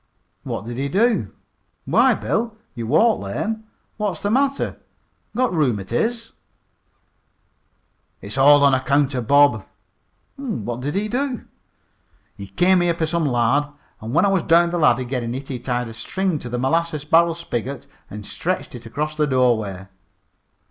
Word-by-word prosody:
"What - - -5
did 120 +2 -6
he 140 +1 -1
do? 230 - +1 0.5
Why, - - +4
Bill, 225 -1 -2 0.2
you 115 -2 -5
walk 220 - +3
lame. 220 0 -4 0.3
What's 205 -6 -2
the 205 - -2
matter, 275 +3 0 0.6
got 250 -2 +1
rheumatiz?" 150 - -1 1.9
"It's 100 +3 -6
all 145 +2 +6
on 140 -1 +5
account 140 +2 +2
of 125 -3 -3
Bob." 140 -7 +5 0.7
"What 120 - -4
did 145 +6 -3
he 205 +2 0
do?" 255 +2 -2 1.1
"Came 180 0 +4
here 175 -1 +1
for 165 - 0
some 160 -1 0
lard. 125 +3 +2 0.3
When 120 - +1
I - - +3
was 195 -2 +2
down 170 +2 +4
cellar 155 -8 +4
gittin' 120 -1 -3
it 135 +1 -7
he 130 -3 -4
tied 125 -1 -2
a 115 - -8
string 175 +9 -2
to 125 - -7
the 125 - -3
molasses 155 +3 0
barrel 165 +2 +4
spigot 140 -6 -5 0.2
and 105 0 -8
stretched 185 - -3
it 120 -2 -9
across 150 +6 -3
the 150 -1 +1
doorway." 110 -8 +1
145 Hz, 150 wpm, -21 LUFS, 120-185 Hz, 1.9 s, all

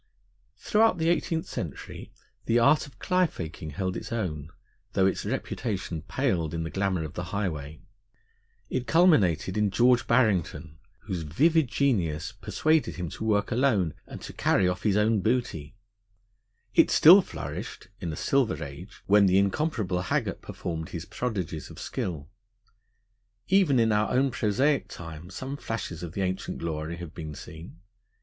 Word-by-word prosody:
Throughout 215 - +3
the 165 0 +1
eighteenth 165 0 0
century 80 -6 -7 0.4
the 115 - +3
art 140 +6 +4
of 140 - -17
cly 180 -1 +2
faking 80 - -7
held 95 +5 -3
its - - -6
own, 80 -10 -3 0.4
though 95 - +3
its 95 - 0
reputation 105 -7 -3
paled 80 0 -1
in 80 - -2
the 80 - -5
glamour 95 -3 0
of 80 - -7
the 90 - -4
highway. 80 -7 -4 0.9
It 125 -1 -3
culminated 110 - +3
in 105 -1 +2
George 120 +4 +3
Barrington, 85 - +1 0.2
whose 95 -5 -4
vivid 150 - +2
genius 95 - 0
persuaded 155 +9 0
him 90 -2 -4
to - - -7
work 105 -1 +1
alone 115 - +2
and - - -8
to - - -8
carry 90 - +2
off 90 0 -1
his 105 -2 +2
own 105 0 +2
booty; 105 - -1 1.0
it - - +5
still - - +8
flourished - - -7
(in 85 -4 -4
a - - -5
silver 130 - +1
age) 75 +9 -10
when 100 0 +5
the 95 +1 +4
incomparable 100 - 0
Haggart - - -1
performed 80 -1 -5
his 85 -2 -6
prodigies 95 -11 -4
of - - -12
skill; 80 -5 -4 1.2
even 190 -8 +4
in 115 -1 +3
our 110 +6 +2
prosaic 130 +6 +1
time 80 0 -9
some 135 +8 -6
flashes 115 - -5
of 85 -2 -6
the 100 - -3
ancient 95 0 -2
glory 80 0 -4
have 85 -2 -8
been 80 -4 -7
seen. 80 +3 -11
95 Hz, 155 wpm, -27 LUFS, 85-125 Hz, 1.2 s, still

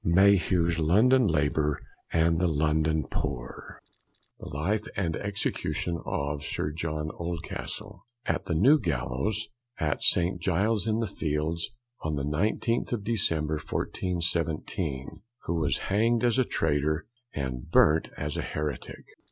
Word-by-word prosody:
Mayhew's 85 -2 +4
London 110 +10 +5
Labour 75 -2 +1 0.3
and 80 0 +3
the 90 - +3
London 80 -1 +1
Poor. 60 -3 -5 0.6
THE - - -8
LIFE 100 +9 -1
& - - -14
EXECUTION 90 -1 -1
OF 70 +1 -2
SIR 75 - -2
JOHN 80 -1 -3
OLDCASTLE 90 +3 -5 0.2
AT - - -1
THE 85 - -1
NEW 135 - +6
GALLOWS, 80 - -1 0.3
AT 75 -2 0
ST. 90 0 +2
GILES'S 100 +5 +1
IN 110 +1 +1
THE - - +1
FIELDS, 80 -2 -1 0.3
ON 80 -1 -1
THE 70 - -2
19th 105 +9 0
OF 110 -4 -2
DECEMBER, 80 -8 0
1417. 85 -3 -2 0.3
_Who 85 0 0
was 75 - +1
Hang'd 115 +4 +1
as 120 +1 +3
a 130 - +4
Traytor, 75 -2 0 0.3
and 65 -3 -4
Burnt 75 +2 +5
as 75 0 -3
a - - 0
Heretick. 75 -3 -4
85 Hz, 130 wpm, -28 LUFS, 75-100 Hz, 0.6 s, NEW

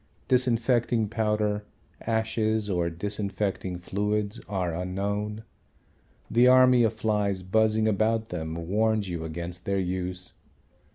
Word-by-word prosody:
Disinfecting 120 -3 +2
powder, 105 -2 0 0.4
ashes, 110 -2 0
or 85 -2 +1
disinfecting 100 0 -3
fluids 105 +4 -2
are 90 -4 -1
unknown. 100 +4 -3 0.8
The 120 +2 +4
army 130 -1 +6
of 115 -1 +3
flies 105 -3 0
buzzing 110 +3 +2
about 110 +2 +1
them 80 -1 -4
warns 110 +1 +1
you 85 -2 -4
against 85 +2 -6
their 100 0 0
use. 90 -1 -3
105 Hz, 110 wpm, -27 LUFS, 90-110 Hz, 0.8 s, army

